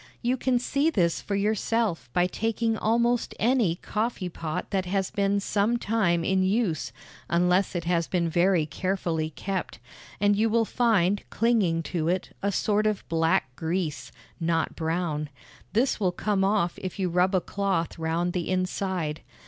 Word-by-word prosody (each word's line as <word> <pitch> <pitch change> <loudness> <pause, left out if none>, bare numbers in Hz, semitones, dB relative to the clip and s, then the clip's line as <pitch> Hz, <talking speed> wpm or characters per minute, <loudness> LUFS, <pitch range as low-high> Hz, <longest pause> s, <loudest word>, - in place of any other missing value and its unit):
You 245 +2 +2
can 255 -1 +1
see 280 +5 +1
this 170 - +1
for 200 - -3
yourself 205 - 0
by 175 +5 +3
taking 225 +4 -1
almost 235 +2 +1
any 230 -7 +2
coffee 210 -1 -2
pot 160 -2 -5
that 190 -2 0
has 195 0 -1
been 200 0 +1
some 205 +4 +1
time 200 -7 +1
in 190 +2 +2
use 190 -4 0 0.4
(unless 180 +2 +2
it 170 - -1
has 170 -1 +1
been 175 -2 0
very 175 0 +3
carefully 165 -1 -2
kept), 190 +4 -4 0.4
and 205 0 +3
you 220 +2 +2
will 225 +1 +2
find 205 -5 +2
clinging 205 -8 +2
to 160 0 -2
it 180 +1 -1
a 200 - 0
sort 210 +1 +1
of 215 -2 -2
black 165 -4 +1
grease 160 -5 -3 0.3
(not 165 -1 0
brown); 160 -2 -2 0.4
this 240 +3 +2
will 185 -4 +2
come 195 +1 0
off 195 -3 +1
if 185 -2 -5
you 190 -2 0
rub 180 +2 +2
a - - +4
cloth 190 -3 -2
round 165 +2 -1
the 175 -2 -2
inside. 185 -4 -1
190 Hz, 160 wpm, -26 LUFS, 170-215 Hz, 0.4 s, a